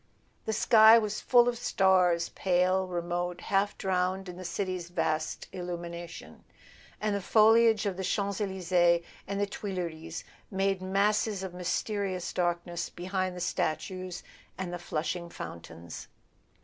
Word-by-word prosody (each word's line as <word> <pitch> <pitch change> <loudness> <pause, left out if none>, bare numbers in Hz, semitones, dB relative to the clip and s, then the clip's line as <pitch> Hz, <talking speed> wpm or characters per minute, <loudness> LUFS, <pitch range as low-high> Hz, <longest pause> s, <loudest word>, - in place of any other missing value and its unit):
The 220 - -1
sky 220 +1 +7
was 215 -2 -1
full 240 -1 +5
of 240 -1 -1
stars, 180 -5 +3
pale, 185 0 +1
remote, 175 0 -2
half 200 +2 0
drowned 185 0 -1
in 180 - -7
the 185 - -8
city's 185 -1 -3
vast 155 -3 -2
illumination; 175 -1 -7 0.6
and 210 -1 0
the 200 - -2
foliage 220 +1 +5
of 195 -3 -1
the 190 - -3
Champs 200 +2 -1
Elysees 175 -3 +2 0.2
and 200 0 -2
the 205 - +2
Tuileries 180 -8 -5 0.3
made 195 -1 0
masses 200 +1 +1
of 190 -2 -5
mysterious 185 +1 -2
darkness 175 -1 -1
behind 185 +1 -3
the - - -6
statues 180 +3 -2 0.3
and 180 -2 -4
the 175 - -4
flashing 170 +1 -3
fountains. 85 - -9
185 Hz, 135 wpm, -29 LUFS, 175-200 Hz, 0.6 s, sky